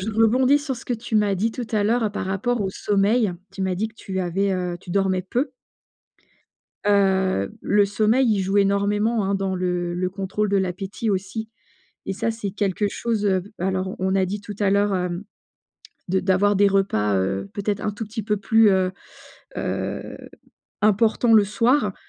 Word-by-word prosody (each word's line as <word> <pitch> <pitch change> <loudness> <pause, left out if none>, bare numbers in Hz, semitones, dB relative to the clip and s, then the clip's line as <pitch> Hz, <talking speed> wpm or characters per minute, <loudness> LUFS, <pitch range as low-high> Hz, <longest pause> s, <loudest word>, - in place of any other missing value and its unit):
je 205 +4 -3
rebondis 250 +6 +4
sur 285 -3 -4
ce 240 - -11
que 245 - -2
tu 230 0 -6
m'as 205 -2 +2
dit 210 +5 0
tout 245 -1 -5
à 210 -2 +2
l'heure 225 0 +1
par 205 - -3
rapport 215 +5 -1
au 195 -2 -1
sommeil. 205 +2 +1 0.2
Tu 195 - -5
m'as 190 -1 0
dit 215 +5 -2
que 220 - -21
tu 190 -3 -4
avais, 190 +3 0
heu 180 -1 -2
tu - - -11
dormais 190 0 +1
peu 250 +8 -2 1.3
heu, 190 - +2
le 205 0 +3
sommeil, 220 +6 +2
il 205 -3 +2
joue 195 +2 0
énormément, 205 +3 +2
hein, 200 +1 0
dans 195 -1 -1
le 180 -1 -1
le 180 +1 -1
contrôle 195 +2 -2
de 200 - +2
l'appétit 190 +4 -2
aussi 200 +3 -3 0.6
et - - -1
ça, 205 +4 -1
c'est 215 -3 -5
quelque 205 0 -1
chose, 225 -2 -2
heu, 190 -2 +2 0.2
alors 190 +1 -1
on 190 +1 0
a 190 -1 +3
dit 200 +3 -4
tout 205 0 -8
à 205 -2 +2
l'heure, 200 0 +2
hem, 180 +1 -2 0.9
de 190 +1 +2
d'avoir 195 +2 +2
des 200 +1 +5
repas, 105 - +1
heu, 95 +1 -2
peut-être 205 0 -2
un 210 - -1
tout 215 +2 -6
petit 220 +1 -5
peu 210 +1 0
plus, 220 +2 +4
heu 190 -1 +2 0.7
heu, - - -3 0.7
importants 220 +3 +3
le 215 -2 +7
soir, 220 +1 +1
200 Hz, 185 wpm, -23 LUFS, 190-215 Hz, 1.3 s, le